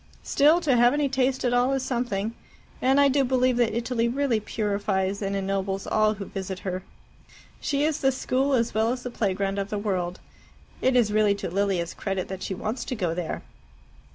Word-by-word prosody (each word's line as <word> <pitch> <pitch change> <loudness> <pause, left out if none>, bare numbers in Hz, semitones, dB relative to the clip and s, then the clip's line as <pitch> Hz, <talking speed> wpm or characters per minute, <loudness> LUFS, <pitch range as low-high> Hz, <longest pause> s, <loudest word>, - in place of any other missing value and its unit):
Still, 305 +5 +4
to 290 -7 +2
have 240 +1 +5
any 295 -1 +1
taste 260 -1 0
at 245 - +2
all 245 +2 +3
is 270 -1 -1
something. 235 -4 -2 0.5
And 265 +2 +4
I 285 - +6
do 275 0 +3
believe 255 -1 +2
that 235 -3 +2
Italy 235 0 0
really 255 -2 +1
purifies 200 -2 -1
and 200 0 -1
ennobles 195 0 -2
all 215 0 +2
who 200 -1 -6
visit 190 -1 -5
her. 185 0 -2 0.8
She 285 -1 0
is 310 0 +1
the 270 - +4
school 265 +1 0
as 235 -1 0
well 220 +2 +2
as 250 0 -4
the 250 - -5
playground 195 -2 -1
of 200 0 -3
the 210 - -2
world. 185 -4 -2 0.6
It 260 0 +2
is 225 -4 +3
really 210 -1 +3
to 200 - -5
Lilia's 190 -3 0
credit 195 -2 -3
that 190 -1 -6
she 190 - -3
wants 215 +6 -3
to 255 - -3
go 180 -7 -1
there." 170 -1 -4
220 Hz, 200 wpm, -26 LUFS, 195-255 Hz, 0.8 s, I